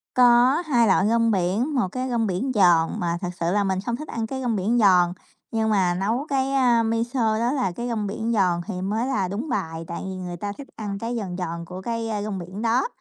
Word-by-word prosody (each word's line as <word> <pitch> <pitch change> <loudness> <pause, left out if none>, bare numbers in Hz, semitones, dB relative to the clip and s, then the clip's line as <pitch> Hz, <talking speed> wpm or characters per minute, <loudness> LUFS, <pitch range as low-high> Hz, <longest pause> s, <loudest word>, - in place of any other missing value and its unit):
Có 245 +1 +6
2 240 -6 +3
loại 195 +1 +3
rong 230 0 +3
biển, 205 - 0
một 240 -8 +2
cái 255 +2 -3
rong 230 -2 0
biển 195 +8 -1
giòn 175 -5 +4
mà 170 -1 -1
thực 180 - -2
sự 170 0 0
là 205 +1 +2
mình 190 -1 0
không 235 - -1
thích 305 +5 -8
ăn 225 -1 -3
cái 265 +3 -4
rong 240 -3 0
biển 210 +5 +1
giòn, 180 -4 +5 0.4
nhưng 220 -1 0
mà 190 -4 +2
nấu 220 +9 -1
cái, 270 -1 0
a, 245 -4 +4
miso 230 0 0
đó 235 +2 +1
là 260 -9 0
cái 240 +7 -5
rong 220 -3 -2
biển 220 +3 -3
giòn 180 -5 +2
thì 185 -4 -4
mới 215 +6 -1
là 205 -9 0
đúng 220 - -4
bài, 165 -7 -3
tại 170 - -5
vì 190 0 -5
người 180 -1 -6
ta 205 +3 -4
thích 280 - -9
ăn 205 -2 -4
cái 235 +1 -3
giòn 190 -6 -4
giòn 170 -1 -4
của 180 +2 -8
cái 230 +1 -3
rong 205 -3 -3
biển 185 +4 -7
đó. 235 - +2
215 Hz, 245 wpm, -24 LUFS, 185-240 Hz, 0.4 s, Có